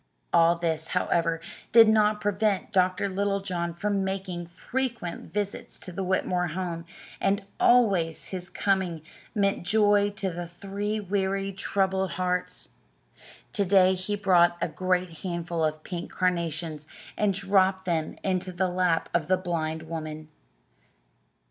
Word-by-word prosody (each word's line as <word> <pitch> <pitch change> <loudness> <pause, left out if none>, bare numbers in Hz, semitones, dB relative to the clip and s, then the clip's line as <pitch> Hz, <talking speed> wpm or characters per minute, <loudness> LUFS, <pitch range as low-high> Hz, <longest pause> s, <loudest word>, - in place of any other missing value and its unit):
All 170 +1 +6
this, 160 -2 -1
however, 165 -1 +1 0.3
did 225 0 +8
not 215 -1 +4
prevent 205 -1 0
Dr. 185 0 +2
Littlejohn 195 -3 -1
from 200 +2 0
making 190 -3 -3
frequent 230 +1 -4
visits 205 -1 -4
to 185 - -9
the 190 +2 -3
Whitmore 180 -1 0
home, 170 0 -4 0.3
and 200 +1 +1
always 195 -10 +3
his 185 -1 -5
coming 190 -6 0 0.3
meant 200 -1 +1
joy 205 +2 +3
to 190 -4 -4
three 200 +4 -3
weary, 195 0 -1
troubled 190 -1 0
hearts. 180 0 -2 0.8
To 205 - +2
day 190 -1 +5
he 185 +3 -2
brought 180 -4 +4
a - - 0
great 180 +1 -1
handful 170 -2 -2
of 155 0 -1
pink 175 -2 -6
carnations 165 -4 -1 0.3
and 205 -2 +1
dropped 190 -1 +2
them 165 -3 -1
into 185 -1 0
the 180 +1 0
lap 180 -2 +1
of 170 -3 +1
the 185 +1 +3
blind 160 -3 -2
woman. 155 -1 -6
185 Hz, 130 wpm, -27 LUFS, 170-200 Hz, 0.8 s, did